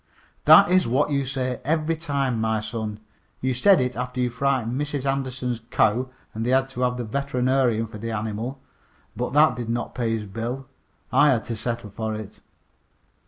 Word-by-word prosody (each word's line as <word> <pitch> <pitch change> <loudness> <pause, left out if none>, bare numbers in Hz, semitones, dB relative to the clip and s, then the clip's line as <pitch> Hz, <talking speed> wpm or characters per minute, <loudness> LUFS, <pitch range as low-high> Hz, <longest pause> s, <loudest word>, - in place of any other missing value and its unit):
"That - - +8
is 185 -1 +4
what 140 +5 +1
you 140 -2 0
say 130 -2 -2
every 160 +2 +1
time, 140 -7 -1
my 110 -1 +1
son. 110 -1 -4 0.4
You 130 0 0
said 185 +8 +5
it 125 0 -1
after 125 +1 -4
you 125 -1 +1
frightened 130 0 0
Mrs. 145 -2 -3
Anderson's 130 -3 -2
cow 125 +5 +2 0.2
and 110 - -3
they 120 - -1
had 130 +1 +3
to 125 - -5
have 125 0 +1
the 120 - -3
veterinarian 125 -1 +1
for 110 -1 -10
the 115 +2 -4
animal, 110 +4 -3 0.6
but 125 +1 -3
that 150 +2 +5
did 120 -2 -5
not 120 0 -2
pay 115 -2 0
his 105 - -6
bill. 115 +6 -4 0.5
I 145 +4 +5
had 120 -5 +2
to 115 - -4
settle 115 -1 -4
for 110 +1 -3
it." 105 -1 -8
125 Hz, 185 wpm, -24 LUFS, 115-135 Hz, 0.6 s, That